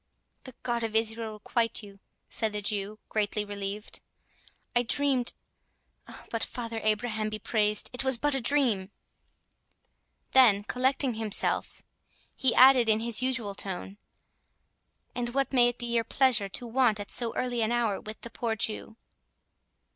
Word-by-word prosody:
"The 260 -2 -9
God 240 -1 -1
of 225 -1 -3
Israel 225 0 0
requite 230 +1 -2
you," 200 -1 -13 0.3
said 220 -2 -1
the 210 - -3
Jew, 205 0 -2
greatly 210 -1 -1
relieved; 205 +1 -5 0.7
"I 240 - +4
dreamed—But 245 -3 -4
Father 230 -2 -4
Abraham 215 0 0
be 215 - -4
praised, 210 -1 +1
it 250 - -1
was 265 -2 +5
but 290 +4 0
a 270 - +1
dream." 235 -8 +1 1.4
Then, 225 -6 +6
collecting 255 +4 0
himself, 220 -2 0 0.5
he 260 -3 +2
added 255 -3 +7
in 215 0 +4
his 235 +1 -1
usual 255 -6 -1
tone, 195 +1 -4 1.1
"And 240 0 -4
what 275 0 0
may 245 -2 +6
it 245 0 -2
be 240 - -5
your 230 -1 +2
pleasure 235 -6 +2
to 240 - -6
want 235 -2 +2
at 205 - -7
so 235 -2 +1
early 245 -2 -1
an 220 +1 0
hour 235 -5 0
with 215 +1 -9
the 235 - -8
poor 230 -2 -2
Jew?" 220 +1 -3
230 Hz, 145 wpm, -28 LUFS, 210-245 Hz, 1.4 s, added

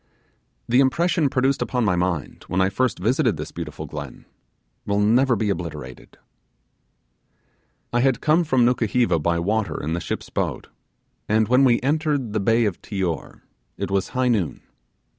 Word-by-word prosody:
The 125 +2 +3
impression 150 +3 +2
produced 135 +1 +1
upon 125 -3 0
the 95 -3 +2
mind, 90 -5 -2
when 90 - -1
I 95 0 +3
first 120 +3 0
visited 110 -1 +1
this 75 - -6
beautiful 80 -2 -6
glen, 70 -3 -8 0.6
will 100 0 0
never 120 +5 +3
be 105 -1 0
obliterated. 80 -9 -7 1.8
I 120 - +2
had 130 -1 +2
come 155 +3 +3
from 130 -6 +2
Nukuheva 120 -6 +2
by 85 +2 0
water 105 +5 -1
in 80 +2 -3
the 85 - -1
ship's - - -5
boat, - - -3 0.6
and 110 0 +3
when 125 +3 +4
we 120 -3 +4
entered 145 -4 0
the 110 - +1
bay 115 +3 +2
of 100 -5 -2
Tior 95 -5 -4 0.4
it - - -4
was 100 -1 +1
high 130 0 0
noon. 100 -9 -1
110 Hz, 160 wpm, -23 LUFS, 90-130 Hz, 1.8 s, when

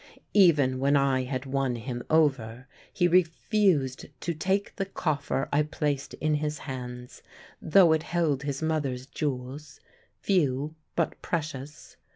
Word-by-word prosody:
Even 145 -10 +4
when 140 +2 +3
I 135 -2 +2
had 130 0 -4
won 135 -2 -1
him 120 +1 -5
over, 130 -6 +1 0.2
he 175 - +2
refused 175 - +2
to 170 - -2
take 190 +5 -1
the 195 -2 -2
coffer 145 -7 -1
I 145 - +4
placed 145 -2 -2
in 155 0 0
his 150 0 -1
hands, 125 -2 -7 0.4
though 165 0 +5
it 160 - +1
held 160 -5 0
his 140 +1 -3
mother's 140 -5 -1
jewels, 140 +1 -5 0.4
few 150 -6 +1 0.2
but 170 - -1
precious. 150 -3 -5
145 Hz, 135 wpm, -27 LUFS, 130-160 Hz, 0.4 s, though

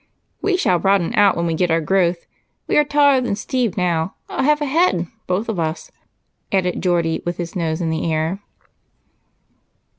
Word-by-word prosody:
"We 390 -2 +1
shall 180 - +2
broaden 195 -3 +1
out 205 -2 +4
when 170 - 0
we 165 - 0
get 175 +2 0
our 165 0 +2
growth. 175 +1 0 0.4
We - - -1
are - - +5
taller 285 -2 +3
than 245 -5 -1
Steve 240 -2 -2
now, 175 -1 0
a - - -2
half 300 +2 +3
a 295 - -1
head, 285 - +2 0.2
both 185 +5 -1
of 220 -6 -3
us," 160 0 -3 0.6
added 185 -2 0
Geordie, 170 -3 0
with 175 0 -3
his 175 -1 -5
nose 165 -2 -2
in 165 -2 -1
the 160 +1 -1
air. 160 +4 -1
180 Hz, 180 wpm, -20 LUFS, 165-225 Hz, 0.6 s, are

